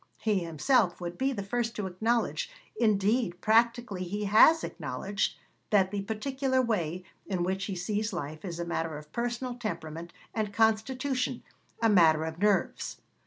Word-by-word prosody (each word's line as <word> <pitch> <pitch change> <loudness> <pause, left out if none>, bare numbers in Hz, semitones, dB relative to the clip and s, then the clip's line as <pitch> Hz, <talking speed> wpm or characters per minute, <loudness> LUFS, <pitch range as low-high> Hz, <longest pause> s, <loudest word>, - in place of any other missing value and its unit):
He 210 -3 +1
himself 175 - +2
would 175 -1 -5
be 265 +7 0
the 200 -7 -3
first 230 +3 -2
to 210 - -3
acknowledge 205 -3 0 0.3
indeed, 215 -3 +2
practically, 230 -3 +2
he 205 +4 -3
has 220 +11 +6
acknowledged 170 +5 -2 0.3
that 190 -3 +3
the 205 -1 -2
particular 260 +6 -1
way 185 -8 0 0.2
in 185 -3 -1
which 190 +2 -1
he 195 - -4
sees 210 +5 -1
life 155 -3 -5
is 175 -3 -5
a 170 - -2
matter 165 -2 -2
of 150 0 -12
personal 240 +1 -2
temperament 170 -7 -5 0.2
and 215 -2 -1
constitution, 250 +4 +1 0.4
a - - +6
matter 160 -6 +5
of 160 +1 -6
nerves. 205 -1 +1
205 Hz, 155 wpm, -29 LUFS, 175-235 Hz, 0.4 s, has